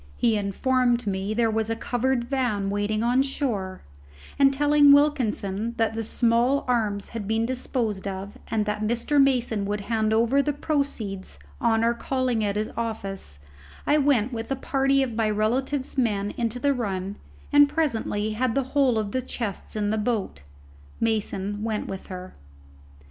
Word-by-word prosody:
He 230 -2 +3
informed 240 +4 +1
me 195 -1 -2
that 215 +1 -2
there 230 -2 +3
was 220 0 -1
a 225 - 0
covered 245 +2 0
van 240 -6 -1
waiting 205 +2 0
on 245 +2 +3
shore; 235 -9 -2 0.6
and 275 -1 +6
telling 290 +1 +5
Wilkinson 235 -7 +2
that 225 -1 +1
the 225 - -2
small 235 +4 +2
arms 215 -5 0
had 225 -4 -5
been 220 +1 +1
disposed 235 -5 -2
of, 195 +1 -5
and 215 -2 0
that 210 0 -2
Mr. 235 +6 +2
Mason 245 -6 +2
would 205 +1 -2
hand 220 0 0
over 235 +5 +3
the 295 +1 -1
proceeds 270 - -3 0.2
on 225 0 +2
our 235 +1 +3
calling 250 -2 -1
at 200 -1 0
his 215 +1 -2
office, 195 - -4 0.4
I 300 +1 +3
went 265 -4 +2
with 225 -1 -4
a - - +2
party 270 0 +2
of 250 -3 -3
my 220 -1 +1
relative's 260 +6 -1
men 205 -4 0
into 235 0 -1
the 280 +3 +2
run 200 -5 -3 0.4
and 290 0 +7
presently 225 -9 -1
had 235 +2 0
the 275 - +2
whole 270 -5 +3
of 210 -2 -2
the 255 - -1
chests 230 -5 -5
in 210 -1 0
the 220 - 0
boat. 210 - -2 0.6
Mason 205 -2 -1
went 220 -2 -2
with 190 - -7
her. 185 0 -8
225 Hz, 170 wpm, -25 LUFS, 210-260 Hz, 0.6 s, and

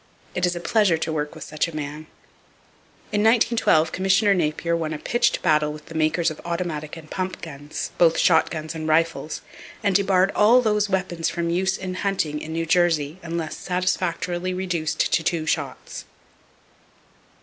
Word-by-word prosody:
It 180 0 +1
is 175 - -1
a - - -3
pleasure 195 -2 +2
to 160 0 -3
work 150 -1 -3
with - - -8
such 155 +2 -2
a 165 - -8
man. 150 +1 -6 1.0
In 210 -1 +1
1912 220 -8 +3
Commissioner 195 +2 +3
Napier 170 -1 0
won 160 -2 -2
a - - -3
pitched 240 +10 0
battle 150 -2 +3
with 150 0 -10
the - - -11
makers 160 +1 +1
of 155 - -9
automatic 170 -3 -4
and 160 -1 -11
pump 185 +3 -4
guns, 145 -2 -6
both 165 -2 +5
shotguns 160 -2 +2
and 160 -1 -5
rifles, 160 0 0 0.4
and 200 -1 +2
debarred 190 0 +3
all 225 +4 +5
those 210 -3 +1
weapons 185 -3 -1
from 170 -1 -2
use 190 +2 +1
in 185 -1 -5
hunting 185 -6 -1
in 160 - -7
New 165 +1 -2
Jersey 165 -2 +1
unless 165 -2 -4
satisfactorily 180 0 -1
reduced 175 -4 -1
to 165 - +2
two 160 -1 0
shots. - - -3
170 Hz, 165 wpm, -23 LUFS, 155-185 Hz, 1.0 s, both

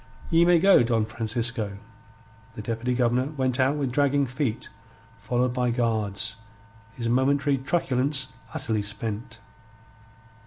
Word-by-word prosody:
Ye 165 +1 +5
may 175 0 +5
go, 195 -1 +6
Don 115 -2 +1
Francisco." 115 -1 -3 0.8
The 110 - -6
Deputy 115 +3 -2
Governor 125 +4 +1
went 130 -1 0
out 135 +2 +3
with 135 -3 -1
dragging 140 +1 +2
feet, 130 -2 -3 0.5
followed 125 0 0
by 125 -1 0
guards, 110 -5 -1 0.6
his 115 -2 -4
momentary 135 +3 +2
truculence 135 -2 0 0.2
utterly 110 -2 -1
spent. 105 +2 -5
125 Hz, 120 wpm, -26 LUFS, 115-135 Hz, 0.8 s, go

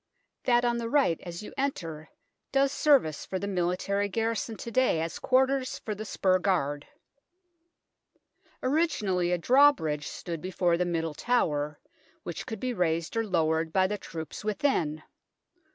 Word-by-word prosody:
That 245 -1 +4
on 240 0 +1
the 230 -1 -3
right 265 - +3
as 175 +2 -7
you - - -9
enter 165 - -3 0.4
does 275 0 +3
service 275 - +3
for 190 - -4
the 200 - -4
military 200 +2 0
garrison 225 +1 -2
to 235 - -7
day 255 -8 +3
as 165 0 -3
quarters 260 0 +2
for 215 - -4
the 215 +1 -6
spur 185 -2 +2
guard. 145 -7 0 1.8
Originally 220 - +1
a 180 - +2
drawbridge 170 - +3
stood 170 -3 -6
before 180 -1 +1
the 180 +1 0
Middle 165 -2 -1
Tower, 150 -8 0 0.4
which 170 - -6
could 220 - -5
be 255 -1 -2
raised 170 -2 -1
or 225 - +1
lowered 160 -3 +1
by 190 +2 +3
the 205 +2 -2
troops 160 +3 -7
within. 190 - 0
190 Hz, 150 wpm, -28 LUFS, 165-240 Hz, 1.8 s, That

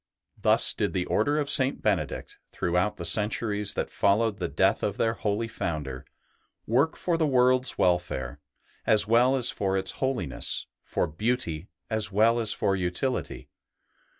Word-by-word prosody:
Thus - - +5
did - - -2
the 90 -1 -1
Order 145 +8 +1
of 145 -2 0
St. 135 -1 +2
Benedict, 95 -9 -2
throughout 90 +4 0
the 85 - -6
centuries 105 +2 0
that - - -3
followed 105 +1 +1
the - - -1
death 95 +1 +1
of 100 -1 -2
their 115 0 +1
holy 110 0 -2
Founder, 75 - -4 0.6
work 135 +8 +2
for 170 -2 -1
the 160 - +2
world's 130 -1 +3
welfare 85 -8 0 0.5
as 105 -1 +4
well 120 +4 +4
as 130 -3 +1
for 95 -1 -1
its 95 0 -1
holiness, 125 - -2 0.2
for - - -1
beauty 90 -1 -2 0.2
as 110 -1 +1
well 115 +4 +3
as 110 -2 +1
for 95 - 0
utility. 95 +8 -2
105 Hz, 150 wpm, -27 LUFS, 90-120 Hz, 0.6 s, Thus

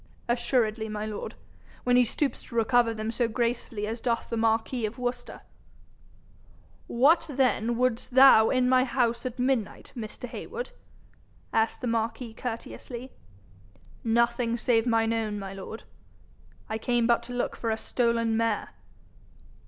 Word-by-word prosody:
'Assuredly, 235 -2 +1
my 210 0 -3
lord, 215 -1 -5 0.5
when 245 0 +3
he 250 - +6
stoops 275 +4 -1
to 235 - -12
recover 230 +1 +3
them 220 0 -3
so 235 0 +1
gracefully 235 -2 -2
as 225 +2 -4
doth 235 -2 -1
the - - 0
marquis 225 +2 +1
of 215 - -9
Worcester.' 245 0 -4 1.5
'What, 320 +7 +4
then, 245 -4 +1
would'st 250 -2 0
thou 260 -5 +8
in 255 -1 +2
my 255 0 +5
house 240 -2 0
at 250 0 -7
midnight, 250 -4 -1
Mr. 230 +1 -6
Heywood?' 485 - -6 0.8
asked 225 0 +1
the - - -3
marquis 230 0 -2
courteously. 245 +2 -6 0.9
'Nothing 235 +1 +1
save 235 -1 +2
mine 225 -1 +2
own, 220 -2 -1
my 195 -1 -6
lord. 195 +3 -8 0.8
I 220 - -3
came 240 0 +1
but 235 0 +3
to 245 - -8
look 245 - -2
for 230 - -3
a 220 - 0
stolen 230 -1 0
mare.' 225 -2 0
235 Hz, 145 wpm, -27 LUFS, 225-250 Hz, 1.5 s, thou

